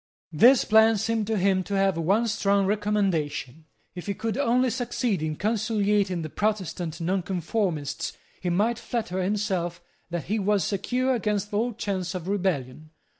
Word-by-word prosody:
This 240 - +6
plan 220 0 +5
seemed 220 0 -1
to 220 -1 0
him 190 0 +2
to 200 - -3
have 195 -1 +2
one 195 +8 +2
strong 200 -2 +2
recommendation. 190 -9 -1 0.3
If 175 +1 -8
he 200 - -1
could 225 +2 -3
only 255 -1 +2
succeed 240 - -1
in 155 -1 -2
conciliating 205 -3 0
the 155 - -5
Protestant 185 -6 -2
Nonconformists 180 -3 -1 0.3
he 180 - -1
might 215 +7 +1
flatter 200 -6 -3
himself 185 -3 -1 0.3
that 170 -2 -3
he 215 +8 -1
was 205 -1 +2
secure 250 +8 0
against 210 -3 -1
all 230 +4 0
chance 190 -4 -3
of 180 -1 -5
rebellion. 155 -8 -2
200 Hz, 150 wpm, -26 LUFS, 180-220 Hz, 0.3 s, This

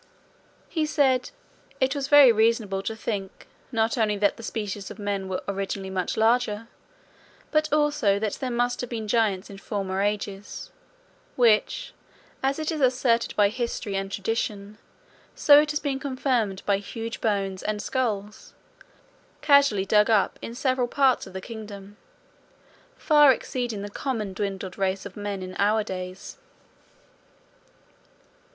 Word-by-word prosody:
He 315 -2 -1
said 265 -4 +2 0.5
"it 260 0 +2
was 280 -2 -3
very 285 -3 +8
reasonable 220 -3 +1
to 220 +3 -4
think, 200 -3 -5 0.3
not 225 +1 0
only 210 -2 +2
that 205 0 +2
the - - -11
species 210 -3 -4
of - - -9
men 200 -2 -3
were 185 - -3
originally 195 -1 -3
much 185 -1 -2
larger, 225 -1 +1 0.8
but 310 0 +1
also 295 -9 +2
that 210 0 -2
there 260 - -1
must 245 0 0
have 245 - -5
been 225 -3 -4
giants 205 -4 +1
in 195 - -10
former 195 -2 -3
ages; 205 -1 -3 0.6
which, 245 - +2 0.5
as 270 +1 0
it 310 0 -2
is 310 -2 -3
asserted 250 -2 +2
by 205 -1 +4
history 235 -3 -3
and 195 0 -3
tradition, 210 0 -3 0.6
so 290 0 +7
it 300 - -2
has 300 0 0
been 275 -3 -2
confirmed 255 -8 -1
by 200 -1 +3
huge 225 +3 -6
bones 195 -3 -1
and 215 0 -2
skulls, 210 -4 -3 0.9
casually 280 -10 +4
dug 210 +2 +4
up 210 -4 +2
in 230 - -7
several 255 -1 0
parts 265 -3 +2
of 190 - -12
the 190 - -5
kingdom, 205 -2 -9 1.0
far 295 -3 +6
exceeding 240 -4 -3
the - - -4
common 215 -2 -3
dwindled 195 -2 -4
race 190 0 -1
of 200 - -9
men 205 -2 -4
in 185 0 -8
our 210 +2 +3
days." 185 -1 -7
215 Hz, 145 wpm, -25 LUFS, 200-255 Hz, 1.0 s, very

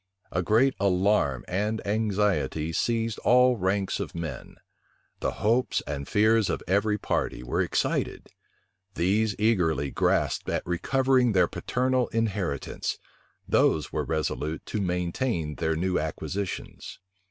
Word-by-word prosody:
A 90 - 0
great 115 +8 +3
alarm 95 - +2
and 105 +4 -1
anxiety 100 -6 0
seized 115 +4 0
all 125 0 +5
ranks 95 0 0
of - - -5
men: 85 -1 -6 0.6
the - - -1
hopes 120 +4 +2
and 70 -1 -5
fears 110 0 +3
of - - -2
every 105 +3 +2
party 60 - -2
were 60 - -1
excited: - - -1 0.6
these 100 +4 +1
eagerly 85 - +1
grasped - - 0
at - - -1
recovering 130 +7 +2
their 90 - +4
paternal 130 0 0
inheritance; 100 -10 -2 0.5
those 75 -2 +2
were - - 0
resolute 80 0 -2
to 105 - -3
maintain 90 - -1
their 80 0 0
new 90 +2 0
acquisitions. 95 +5 -5
100 Hz, 120 wpm, -27 LUFS, 85-110 Hz, 0.6 s, all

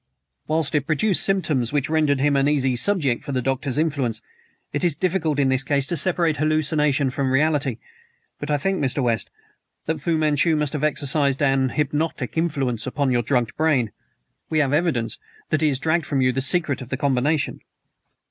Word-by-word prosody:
"Whilst 155 -1 0
it 145 -2 0
produced 180 +5 +2
symptoms 160 - 0
which 145 0 0
rendered 155 -3 +1
him 145 0 +2
an 135 0 +2
easy 135 -3 +1
subject 140 -4 +1
for 140 - -5
the 130 - 0
Doctor's 135 +1 -2
influence. 140 -8 -1 0.5
It 145 - -2
is 170 -5 +2
difficult 165 -3 -1
in 140 -2 +2
this 130 0 +2
case 140 0 0
to 170 - -2
separate 170 -1 +2
hallucination 150 -3 +1
from 135 0 -1
reality, 140 -3 +1 0.6
but 145 - -6
I 145 - +2
think, 190 +6 -1
Mr. 135 +1 0
West, 115 -3 -1 0.6
that 160 -1 -2
Fu 165 +2 0
Manchu 155 +1 +2
must 150 -2 -1
have 150 -1 -3
exercised 145 -2 +1
an 135 -1 +2
hypnotic 150 -1 -2
influence 135 -8 -1
upon 135 +1 -1
your 120 -1 +2
drugged 120 -1 -1
brain. 140 -9 +1 0.6
We 160 - -1
have 145 -2 +2
evidence 150 -8 0 0.3
that 155 - +1
he 155 -2 +3
dragged 160 +4 0
from 140 - 0
you 130 -1 +3
the 135 - -2
secret 140 -1 +2
of 125 - -9
the 130 - -2
combination." 140 +2 0
145 Hz, 185 wpm, -22 LUFS, 135-155 Hz, 0.6 s, he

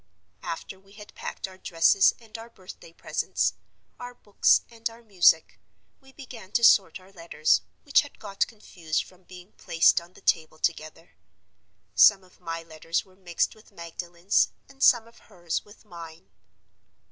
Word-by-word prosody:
"After 180 +3 -7
we 195 +1 -22
had 210 0 -13
packed - - -6
our 190 0 -15
dresses 175 +3 +3
and 225 -2 -17
our 225 +1 -8
birthday 185 -5 -13
presents, - - -1 0.5
our 245 0 -9
books 205 -4 +3
and 230 0 -5
our 230 +1 -16
music, 180 -6 +3 0.4
we 270 -1 -20
began 240 -8 -12
to 235 - +1
sort 195 -4 +5
our 185 +1 -19
letters, 165 -4 +1 0.2
which 285 - +4
had 290 - -13
got 200 -2 -2
confused 175 -8 -4
from 185 0 -20
being 180 +2 -14
placed 165 +1 +2
on 170 +1 -17
the - - -18
table 160 -1 0
together. 160 0 -3 0.8
Some 195 -2 +6
of 180 - -23
my 165 -2 -6
letters 165 +1 -3
were 190 -1 -23
mixed 175 -3 -2
with 215 0 -21
Magdalen's, 170 +1 -1 0.2
and 270 0 -19
some 235 -4 +5
of 230 - -20
hers 175 -5 -5
with 205 +2 -19
mine. 165 - -12
185 Hz, 160 wpm, -26 LUFS, 170-220 Hz, 0.8 s, Some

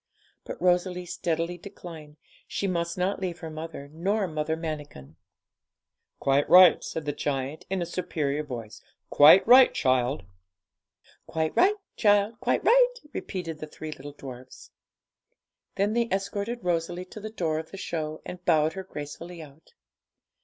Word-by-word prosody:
But - - -7
Rosalie 180 0 +1
steadily 170 0 -2
declined; 160 -5 -11 0.3
she - - -3
must 170 -2 -1
not 185 +2 0
leave 180 -3 -3
her 160 -1 -6
mother 155 -2 -7
nor 195 +5 0
Mother 155 -1 -2
Manikin. 145 - -7 1.0
'Quite 140 +1 +2
right,' 180 -2 +8
said 160 - -5
the 145 - 0
giant, 140 0 -3
in 190 -2 -1
a - - -3
superior 155 -5 -2
voice; 120 -7 -8 0.3
'quite 150 +6 +8
right, 255 +2 +8
child.' 130 - +1 1.0
'Quite 160 -1 -2
right, 395 +3 +5 0.2
child, 205 +1 +3
quite - - 0
right,' - - +5
repeated 165 -4 -5
the 155 - -6
three 155 +1 -8
little 145 0 -9
dwarfs. 130 -2 -11 1.0
Then 205 +2 +1
they 235 0 +1
escorted 200 +4 -2
Rosalie 175 +1 -1
to 200 - -10
the 215 +1 -6
door 165 -7 -1
of 160 - -8
the 195 - -9
show, 155 -4 -4
and 180 0 -8
bowed 160 -2 +3
her 190 - -6
gracefully 165 +1 -8
out. 150 - -18
165 Hz, 145 wpm, -27 LUFS, 150-190 Hz, 1.0 s, right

